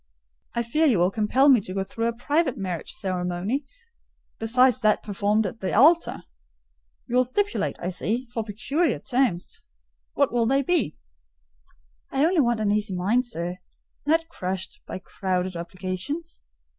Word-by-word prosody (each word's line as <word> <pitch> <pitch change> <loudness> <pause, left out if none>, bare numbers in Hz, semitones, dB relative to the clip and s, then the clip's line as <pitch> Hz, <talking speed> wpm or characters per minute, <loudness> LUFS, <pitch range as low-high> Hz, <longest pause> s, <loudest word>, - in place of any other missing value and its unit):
I 235 - +1
fear 305 +8 +2
you 245 -8 +4
will 175 +2 +3
compel 225 +7 +3
me 260 -6 +7
to 185 -1 -6
go 195 - 0
through 230 +4 -2
a - - +1
private 285 +4 0
marriage 180 -4 -4
ceremony, 185 +7 -2 0.7
besides 250 +2 +4
that 215 -1 +2
performed 210 +1 +1
at 200 +4 -5
the 190 - -2
altar. 320 +9 +4 0.8
You 245 0 0
will 255 - +6
stipulate, 410 +12 -1
I 175 - -3
see, 230 +7 -2
for 225 - -1
peculiar 260 - 0
terms—what - - -2
will 235 -2 +2
they 270 +2 +2
be?" 315 - 0 1.1
"I 275 +2 +2
only 340 -1 +3
want 240 -3 +1
an 205 -1 +2
easy 210 -2 0
mind, 220 +8 +1
sir; 175 -4 -4 0.5
not 325 +2 +3
crushed 185 - -5
by - - -5
crowded 185 -1 -2
obligations. 185 - -5
220 Hz, 150 wpm, -25 LUFS, 185-265 Hz, 1.1 s, me